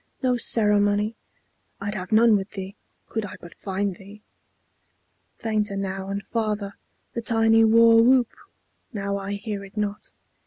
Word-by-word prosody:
No 255 -1 +3
ceremony! 210 -2 +2 0.6
(I'd 200 +1 -3
have 185 -3 -6
none 225 0 +6
with 195 0 -2
thee, 195 0 -6 0.3
Could 220 - -3
I 200 - -7
but 170 - -12
find 195 -1 -3
thee.) 205 +2 -14 1.1
Fainter 210 -3 -1
now 195 0 -4
and 200 0 -4
farther 210 -3 -2 0.4
The 235 - -3
tiny 225 0 +4
war 230 +1 +6
whoop; 250 0 +4 0.6
now 200 -3 -2
I 200 0 -4
hear 205 0 -5
it 195 +2 -14
not. 210 -1 -3
210 Hz, 145 wpm, -24 LUFS, 200-225 Hz, 1.1 s, none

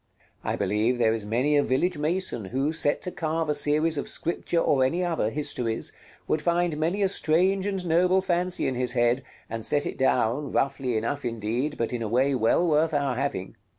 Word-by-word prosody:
I - - -1
believe 105 +5 0
there 115 -2 +3
is 110 -2 -4
many 125 +7 +1
a 145 - +5
village 175 +8 0
mason 155 - -1
who, 135 +9 -1
set 150 -2 +1
to 180 - -3
carve 160 -1 -2
a - - +3
series 150 +1 +2
of - - -2
Scripture 170 +1 -1
or 140 -5 +3
any 170 +8 0
other 165 -11 0
histories, 125 -5 -1 0.3
would 155 - 0
find 170 0 +1
many 170 +7 0
a - - +4
strange 190 +2 +1
and 195 -3 -3
noble 180 +3 +3
fancy 180 0 0
in 130 - -1
his 125 0 0
head, 120 +1 +2 0.3
and 115 0 -5
set 145 +5 +1
it - - -5
down, 130 +1 +1
roughly 135 -3 0
enough 130 +6 -2
indeed, 120 +5 -2
but 115 +1 -2
in 120 - -3
a 110 - -2
way 130 +5 +2
well 130 +8 +2
worth 155 0 +2
our 140 -3 0
having. 125 -8 -3
145 Hz, 200 wpm, -26 LUFS, 120-165 Hz, 0.3 s, a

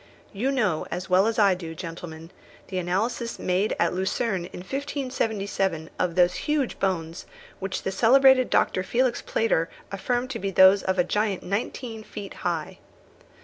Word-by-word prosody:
You 225 +7 -1
know 210 - 0
as 180 +1 -5
well 190 +3 +5
as 225 - -1
I 200 -3 +5
do, 165 -3 -6
gentlemen, 165 0 -8 0.4
the 185 -1 -2
analysis 215 +7 -1
made 185 +4 0
at - - +2
Lucerne 190 0 -1
in 180 - -9
1577 215 - -2
of 175 -2 0
those 180 -1 +4
huge 295 -4 0
bones 170 -3 -2 0.3
which 195 0 -4
the 190 - -1
celebrated 255 +4 +5
Dr. 185 - +2
Felix 245 +5 0
Plater 175 -7 0 0.2
affirmed 245 +6 -1
to 230 - -4
be 200 - -2
those 190 +1 +6
of 190 0 -1
a 180 - +4
giant 205 +1 -1
nineteen 220 +3 -3
feet 205 -2 -8
high. - - -3
195 Hz, 155 wpm, -25 LUFS, 180-235 Hz, 0.4 s, those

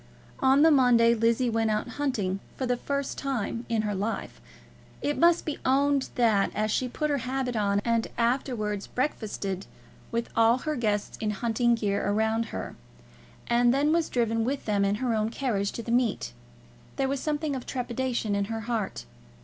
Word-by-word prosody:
On 270 +2 +5
the 325 - +7
Monday 245 -4 +5
Lizzie 230 +2 +2
went 225 -1 +1
out 215 0 0
hunting 215 -10 -1 0.2
for 260 - -1
the 250 0 +1
first 280 +2 -3
time 240 -3 -3
in 225 -2 +1
her 210 -1 -1
life. 205 +4 -4 0.6
It 290 - -1
must 340 0 +4
be 305 - -3
owned 275 +1 +2
that, 220 -5 +3
as 215 0 0
she 255 - 0
put 300 +4 -2
her 285 - +1
habit 255 0 -2
on, 200 -2 +1
and 230 -1 +1
afterwards 230 -4 -1
breakfasted 205 -7 -3 0.4
with 235 0 -2
all 230 +1 +5
her 305 +4 -3
guests 210 -5 -1
in 215 - 0
hunting 235 +3 +1
gear 205 -3 -1
around 220 +3 +1
her, - - -6 0.7
and 240 0 +3
then 285 +4 +2
was 330 -1 +1
driven 230 -2 +1
with 270 +4 -2
them 205 -2 +1
in 200 +1 +2
her 240 +2 -1
own 215 0 0
carriage 225 -5 -1
to 235 - -5
the 230 - -4
meet, 235 - 0 0.6
there 270 - 0
was 275 0 -1
something 300 0 -1
of 255 - -6
trepidation 245 -4 -2
at 200 0 0
her 225 0 -3
heart. 225 -2 -3
235 Hz, 180 wpm, -27 LUFS, 215-265 Hz, 0.7 s, the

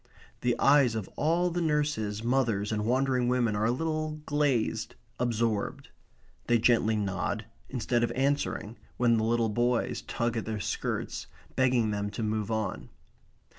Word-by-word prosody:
The 125 -1 +1
eyes 140 -5 +5
of 110 -4 -3
all 170 +4 +1
the 175 +1 -1
nurses, 145 -10 0
mothers, 115 -5 +1
and 105 -1 -1
wandering 130 0 +2
women 120 -3 +2
are 105 +1 +1
a - - +3
little 155 +2 -2
glazed, 145 -7 0 0.2
absorbed. 115 -3 -1 0.6
They 120 - +4
gently 110 -1 +3
nod 95 -3 -2 0.2
instead 120 -1 0
of 120 - +1
answering 130 -4 -1 0.2
when 120 -2 +4
the 110 - +1
little 115 0 +2
boys 120 +2 0
tug 120 0 -2
at 115 - -2
their 110 -1 -3
skirts, - - -3 0.3
begging 125 -4 +3
them 105 0 -2
to 105 +3 -4
move 110 -1 -1
on. 110 -4 -2
120 Hz, 150 wpm, -29 LUFS, 110-130 Hz, 0.6 s, eyes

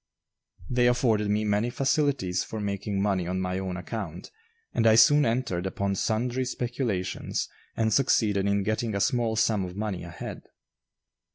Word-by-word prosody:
They 125 0 +2
afforded 115 -4 +2
me 105 +1 +1
many 105 +3 +1
facilities 135 - 0
for 110 - -6
making 100 -1 -2
money 95 -4 0
on 95 +1 -1
my 90 0 -2
own 95 -1 -4
account 90 -2 -6 0.4
and 115 - +2
I 110 - +7
soon 145 +4 +6
entered 115 -7 -1
upon 100 +1 -1
sundry 120 +6 0
speculations 120 -6 -2 0.3
and 110 -1 +2
succeeded 105 -7 +2
in 100 0 +1
getting 110 +1 -1
a - - 0
small 115 +1 +1
sum 110 -3 +2
of 90 0 -6
money 105 -3 -3
ahead. - - -7
105 Hz, 155 wpm, -27 LUFS, 95-120 Hz, 0.4 s, I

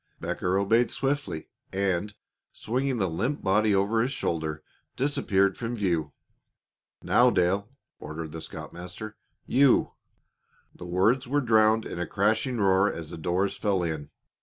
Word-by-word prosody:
Becker 90 +1 -1
obeyed 115 +5 +3
swiftly, 135 - -2 0.2
and, 100 +1 -1 0.4
swinging 130 +3 -1
the 95 -4 +1
limp 115 - -2
body 105 +2 +3
over 100 +4 +2
his 125 +3 0
shoulder, 80 - -2 0.3
disappeared 100 -8 +1
from 120 0 -3
view. 85 -9 -1 0.9
"Now, 125 +1 +5
Dale," 95 +1 +1 0.3
ordered 80 0 -6
the 80 +1 -7
scoutmaster. 90 +7 -8 0.3
"You 135 -1 +4 0.4
" - - -39
The 90 - -9
words 110 +9 +2
were 145 +3 +1
drowned 110 -3 +3
in - - -6
a 90 - -2
crashing 110 +5 +1
roar 95 0 +3
as 80 -2 -7
the - - -6
doors 90 +4 0
fell 100 -4 0
in. 80 -3 -3
100 Hz, 140 wpm, -27 LUFS, 90-115 Hz, 0.9 s, Now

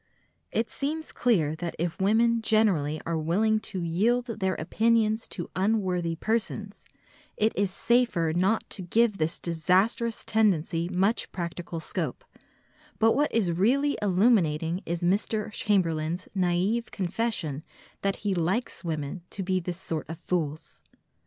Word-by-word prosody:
It 225 +1 0
seems 310 +3 -3
clear 165 -11 +2
that 170 0 -4
if 170 +2 -3
women 230 +3 +3
generally 190 -10 +2
are 165 -1 -1
willing 210 +8 +2
to 195 -4 -5
yield 220 +9 +1
their 190 -1 0
opinions 220 +5 +1
to 175 -5 -6
unworthy 185 -4 0
persons, 215 +1 -2 0.5
it 220 +1 +2
is 200 -1 +1
safer 195 -6 +1
not 190 +5 +1
to 195 - -4
give 210 +3 +2
this 155 +1 0
disastrous 190 +8 +1
tendency 175 -6 +1
much 190 +5 +1
practical 170 -1 -5
scope, - - -4 0.7
but 225 +1 +4
what 290 +5 +2
is 205 -7 +1
really 260 +12 +2
illuminating 180 -5 +2
is 170 +1 -2
Mr. 210 +4 0
Chamberlain's 175 -5 0
naïve 190 +6 +1
confession 185 -6 -2 0.4
that 195 0 0
he 200 - +2
likes 185 +8 -1
women 155 +1 -3
to 195 - -5
be 185 0 +1
this 175 0 -5
sort 160 -5 -4
of 165 - -5
fools. 160 -3 -3
190 Hz, 135 wpm, -27 LUFS, 170-220 Hz, 0.7 s, but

